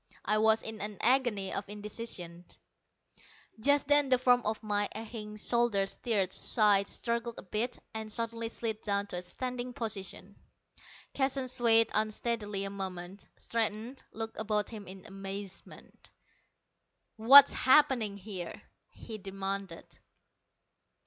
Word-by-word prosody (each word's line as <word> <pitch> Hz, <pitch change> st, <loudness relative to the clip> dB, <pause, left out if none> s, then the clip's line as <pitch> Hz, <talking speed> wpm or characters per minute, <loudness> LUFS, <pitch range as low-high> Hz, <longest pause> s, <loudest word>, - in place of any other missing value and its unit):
I 215 Hz, +1 st, +2 dB
was 220 Hz, 0 st, +4 dB
in 220 Hz, -2 st, -5 dB
an 210 Hz, -1 st, -4 dB
agony 240 Hz, -6 st, +2 dB
of 195 Hz, -, -4 dB
indecision. 205 Hz, -5 st, -5 dB, 1.1 s
Just 285 Hz, +4 st, +3 dB
then 290 Hz, -1 st, +4 dB
the 255 Hz, -, +5 dB
form 245 Hz, -1 st, +4 dB
on 215 Hz, +1 st, 0 dB
my 205 Hz, -1 st, 0 dB
aching 215 Hz, -1 st, -7 dB
shoulder 225 Hz, -2 st, +1 dB
stirred, 200 Hz, -2 st, -1 dB
sighed, 205 Hz, -3 st, +3 dB
struggled 235 Hz, 0 st, -3 dB
a -, -, -8 dB
bit, 215 Hz, +6 st, -2 dB, 0.2 s
and 220 Hz, -1 st, -5 dB
suddenly 230 Hz, 0 st, -2 dB
slid 220 Hz, -2 st, -4 dB
down 200 Hz, -1 st, -1 dB
to 190 Hz, -3 st, -5 dB
a -, -, -3 dB
standing 250 Hz, +6 st, -5 dB
position. 215 Hz, -5 st, -5 dB, 0.8 s
Keston 270 Hz, -1 st, 0 dB
swayed 230 Hz, -2 st, +4 dB
unsteadily 215 Hz, -1 st, -1 dB
a 195 Hz, -, -4 dB
moment, 190 Hz, -1 st, -7 dB
straightened, 230 Hz, +3 st, -2 dB
looked 225 Hz, 0 st, -6 dB
about 210 Hz, -1 st, -1 dB
him 210 Hz, -3 st, -9 dB
in 190 Hz, +1 st, -10 dB
amazement. 195 Hz, -1 st, -9 dB, 1.1 s
"What's 270 Hz, +6 st, +9 dB
happening 255 Hz, -7 st, +3 dB
here?" 190 Hz, -3 st, -7 dB, 0.3 s
he 220 Hz, -2 st, -9 dB
demanded. 195 Hz, -2 st, -5 dB
215 Hz, 125 wpm, -31 LUFS, 200-235 Hz, 1.1 s, What's